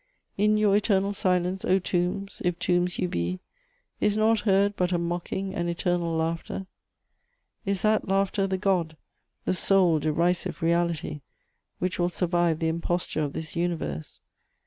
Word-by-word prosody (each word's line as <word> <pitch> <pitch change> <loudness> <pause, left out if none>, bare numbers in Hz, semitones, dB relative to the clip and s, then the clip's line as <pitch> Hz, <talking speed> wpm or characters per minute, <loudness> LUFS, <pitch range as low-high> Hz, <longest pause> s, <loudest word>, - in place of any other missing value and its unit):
In 210 +1 +3
your 210 -2 +4
eternal 200 -1 +2
silence, 185 -1 0
O 185 - +3
tombs, 185 +2 -2
if 180 -2 0
tombs 180 0 +1
you - - 0
be, 90 - -2 0.6
is 210 0 +2
nought 220 +1 +3
heard 200 0 +2
but 180 -1 0
a 175 - +2
mocking 175 +3 -3
and 175 -1 -1
eternal 170 -1 0
laughter? 165 +3 -2 1.0
Is 200 -2 0
that 215 0 +2
laughter 195 +1 +1
the 190 0 -1
God, 180 -5 0 0.5
the - - +1
sole 185 -4 +3
derisive 170 +3 0
reality, 170 -3 0 0.6
which 185 +1 -2
will 175 0 +2
survive 175 -2 +1
the 160 - -1
imposture 170 0 -1
of 145 -1 -2
this 160 -1 -6
universe? 165 - -3
180 Hz, 145 wpm, -26 LUFS, 170-195 Hz, 1.0 s, your